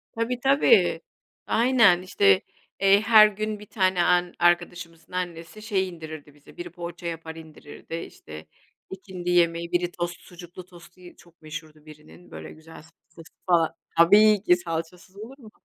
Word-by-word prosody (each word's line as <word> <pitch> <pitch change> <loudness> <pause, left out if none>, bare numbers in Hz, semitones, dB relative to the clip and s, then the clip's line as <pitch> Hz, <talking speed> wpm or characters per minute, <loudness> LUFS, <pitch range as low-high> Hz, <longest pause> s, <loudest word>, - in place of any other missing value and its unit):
Tabii, 235 +2 -2
tabii, 280 - +3 0.5
aynen 225 -7 +3
işte, 100 - +2 0.4
eee, 195 +1 +4
her 215 -1 +7
gün 215 0 -5
bir 210 - -12
tane 185 -4 0
an 180 0 +1
arkadaşımızın 175 -1 -1
annesi 175 +2 -6
şey 195 -4 -2
indirirdi 155 -3 -11
bize. 145 0 -20
Biri 175 0 -7
poğaça 175 -1 -8
yapar, 165 -1 -7
indirirdi 160 0 -11
işte 80 - -10 0.4
ikindi 185 -2 -8
yemeği; 170 -1 +1
biri 175 0 -1
tost. 175 -1 -5
Sucuklu 175 0 -13
tostu 175 0 -18 0.2
çok 170 -1 -22
meşhurdu 155 0 -10
birinin, 155 +3 -16
böyle - - -10
güzel 160 +1 -16
salçası 165 +1 -19
falan. 170 -3 +2 0.2
Tabii 205 +4 +5
ki, 180 - +4
salçasız 175 +2 -7
olur 240 +6 -11
mu? 225 -5 -15
175 Hz, 145 wpm, -24 LUFS, 165-195 Hz, 0.5 s, her